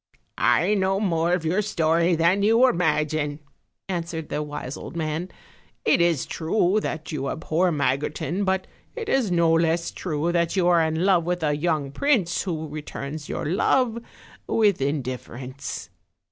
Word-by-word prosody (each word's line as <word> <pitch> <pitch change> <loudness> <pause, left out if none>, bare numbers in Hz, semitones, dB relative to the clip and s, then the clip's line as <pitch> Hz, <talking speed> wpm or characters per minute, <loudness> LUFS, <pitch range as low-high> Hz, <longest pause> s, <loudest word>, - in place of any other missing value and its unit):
"I 180 +6 +3
know 195 -1 +1
more 170 -4 +1
of 180 -2 0
your 180 +6 +2
story 170 -3 +2
than 170 +5 +3
you 225 +5 +5
imagine," 155 - 0 0.5
added 170 -3 -4
the 150 - -2
wise 145 -2 -5
old - - -9
man; 160 +2 -2 0.6
"it - - +4
is 170 -5 +2
true 180 +4 +1
that 160 -4 -4
you 135 -3 -2
abhor 170 +3 0
Magotin, 150 +6 -1
but 190 -1 0 0.3
it 460 -2 -5
is 255 -6 +2
no 170 -2 +3
less 165 +1 +1
true 165 -1 -2
that 170 0 +1
you 180 -2 +2
are 170 -1 +5
in 160 +2 0
love 185 -4 +4
with 175 -1 -1
a 150 -1 +2
young 150 -3 -1
prince, 220 - +1
who 160 -4 -3
returns 150 0 -6
your - - -3
love 230 - +2 0.5
with 205 -8 +2
indifference." 130 -1 -4
165 Hz, 155 wpm, -24 LUFS, 155-185 Hz, 0.6 s, you